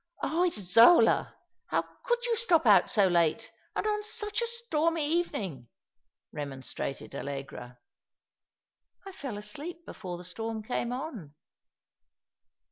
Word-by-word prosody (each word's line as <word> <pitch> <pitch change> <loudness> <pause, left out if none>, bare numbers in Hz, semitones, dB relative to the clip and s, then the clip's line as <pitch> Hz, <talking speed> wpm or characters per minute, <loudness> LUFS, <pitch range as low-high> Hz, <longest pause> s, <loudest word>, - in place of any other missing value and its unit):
" - - -18
Oh, 345 +3 +2
Isola; 230 - +5 0.3
how - - +1 0.2
could 485 0 0
you 475 -1 +1
stop 365 - +3
out 210 -3 +6
so 205 -3 +4
late, 170 -4 +1 0.2
and - - -1
on 420 -1 0
such 420 0 -2
a 470 - +1
stormy 335 -9 0
evening? 230 - -2 0.3
" - - -52 0.3
remonstrated 135 -1 -5
Allegra. 135 -3 -7 0.7
" - - -44
I 390 - -7
fell 270 - -6
asleep 295 +12 -8
before 180 -4 -7
the 175 - -10
storm 220 +4 -4
came 240 +1 -2
on." 245 - -6
240 Hz, 130 wpm, -29 LUFS, -, 0.7 s, out